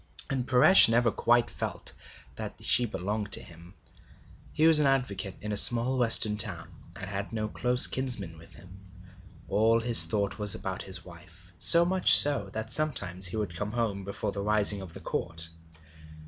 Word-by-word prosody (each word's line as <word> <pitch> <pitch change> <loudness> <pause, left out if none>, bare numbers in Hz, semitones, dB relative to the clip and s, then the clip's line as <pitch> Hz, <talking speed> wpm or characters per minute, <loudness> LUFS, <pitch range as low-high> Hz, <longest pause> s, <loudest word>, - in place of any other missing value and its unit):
And 130 -2 -5
Paresh 130 +5 +5
never 115 0 0
felt - - -21
quite 120 0 -1 0.8
that - - -9
she 120 - 0
belonged 105 0 -7
to - - +4
him. 85 +2 -18 0.8
He 155 - -2
was 160 -2 +6
an 150 - +1
advocate 105 -8 -3
in 105 - -7
a - - -4
small 120 +5 +3
western 110 -3 +2
town, 85 -7 +1 0.3
and 95 - -9
had 100 +1 -8
no 110 -1 -6
close 125 +3 +4
kinsman 110 -11 -2
with 85 - -18
him. 95 +1 -17 0.7
All 110 +3 -1
his 120 0 +5
thought 100 -2 -5
was 105 -2 +2
about 95 -1 -8
his 95 - -7
wife, 90 +1 -18
so 170 0 +5
much 185 +1 +5
so 140 -9 +1
that 110 0 -7
sometimes 100 -12 -2
he 95 - -6
would 100 -6 -6
come 105 +4 -7
home 110 -5 -5
before 100 +1 -7
the 100 - -7
rising 105 -1 0
of 90 -4 -13
the - - -11
Court. 85 -1 -2
105 Hz, 175 wpm, -25 LUFS, 95-120 Hz, 0.8 s, was